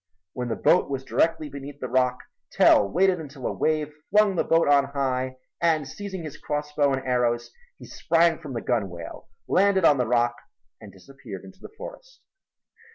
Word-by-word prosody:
When 125 -1 -4
the 115 - -2
boat - - +3
was 135 -1 -3
directly 160 +2 0
beneath 140 0 -9
the 130 - -4
rock 125 0 +1 0.3
Tell 100 - +5
waited 185 - +2
until 140 -4 -9
a - - -1
wave 155 -1 -1 0.2
flung 210 -1 +4
the - - +1
boat 165 -1 +2
on 140 -1 +5
high 130 -2 -2 0.2
and 160 -4 +2
seizing 190 +3 -7
his 155 -3 -8
crossbow 150 -1 -1
and 135 0 -2
arrows 120 -2 0 0.3
he - - -12
sprang 165 -1 +2
from 140 -4 -8
the 115 - -3
gunwale, 95 -8 -4 0.2
landed 190 -1 +3
on 145 -4 +5
the 125 - +1
rock 120 0 +1 0.4
and 105 - -11
disappeared 105 +1 -11
into 190 -1 -14
the - - -11
forest. - - -11
140 Hz, 175 wpm, -25 LUFS, 125-165 Hz, 0.4 s, Tell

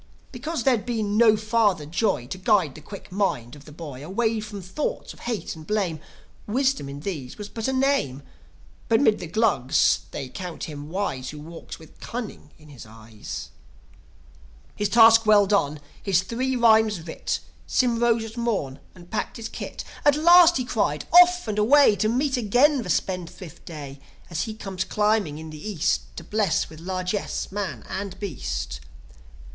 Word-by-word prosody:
Because 275 +2 -4
there'd 245 -5 +2
been 215 -4 -1
no 220 -1 +6
father 215 -7 +1
Joi 170 - 0
To 185 +9 -7
guide 190 - +2
the 155 - -12
quick 200 +4 -11
mind 180 - -1
of 145 +1 -15
a - - -11
boy 145 -4 -8
Away 220 +6 0
from 210 -1 -7
thoughts 245 - -4
of - - -18
hate 235 -7 -4
and 155 -1 -12
blame, 195 -7 -1 0.5
Wisdom 260 - 0
in 140 +1 -7
these 145 -9 -5
was 210 -1 -7
but 225 +1 -4
a - - +1
name. 260 - 0 0.7
But 225 - +4
'mid 220 -7 +3
the 175 - -6
Glugs 145 - +2
they 135 - -5
count 175 +4 -7
him 145 -1 -7
wise 160 -9 -3
Who 150 - -8
walks 165 +3 -9
with 160 - -17
cunning 230 -10 -7
in 155 -1 -17
his 135 -5 -11
eyes. 110 -1 -9 1.2
His 205 -1 -1
task 225 0 +7
well 210 -1 +6
done, 170 -7 +1 0.2
his 185 -3 +2
three 255 +6 -2
rhymes 220 -4 +4
writ, 160 0 -3 0.3
Sym 240 -2 +2
rose 235 -1 +2
at 225 +2 -10
morn, 195 - -2 0.2
and 175 -1 -15
packed 220 - -3
his 230 -1 -6
kit. - - -7 0.2
"At 290 -1 +5
last!" 345 +2 +7
he 255 - -2
cried. 150 - -1
"Off 360 -2 +6
and 210 -1 -1
away 255 +1 +6
To 215 +3 +1
meet 260 +3 +1
again 250 +5 +3
the 190 - -7
spendthrift 180 -1 -3
Day, 145 -4 -8 0.3
As 170 0 -1
he 220 - -6
comes 195 -3 -4
climbing 210 -8 0
in 160 0 -8
the 155 -1 -10
East, 145 - 0
To - - -6
bless 205 -8 0
with 155 - -11
largesse 185 +3 -3
man 190 - -4
and 190 -1 -5
beast. 60 - -4
200 Hz, 175 wpm, -24 LUFS, 155-230 Hz, 1.2 s, task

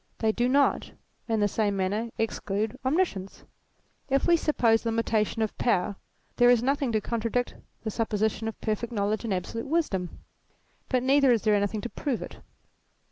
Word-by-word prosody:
They 220 -1 +2
do 240 +3 0
not, 280 +2 +2 0.3
in 225 -2 0
the 205 - +4
same 205 -1 0
manner, 205 +5 -1
exclude 215 0 -2
omniscience: 260 - -1 0.7
if 275 0 +2
we 345 - +5
suppose 240 -9 +2
limitation 225 -1 0
of 215 - -3
power, 200 -4 +1 0.4
there 245 0 +6
is 245 -1 +4
nothing 275 -1 +1
to 215 - +3
contradict 235 +2 -1 0.3
the 220 - -2
supposition 220 -1 -1
of 225 - -5
perfect 225 +2 -2
knowledge 210 +1 -1
and 225 - -2
absolute 195 +7 -3
wisdom. 270 - -1 0.7
But 255 -1 +1
neither 270 0 +4
is 230 -3 +2
there 215 -1 +3
anything 205 +1 0
to 240 - -5
prove 265 -3 -3
it. - - -10
225 Hz, 165 wpm, -27 LUFS, 210-245 Hz, 0.7 s, there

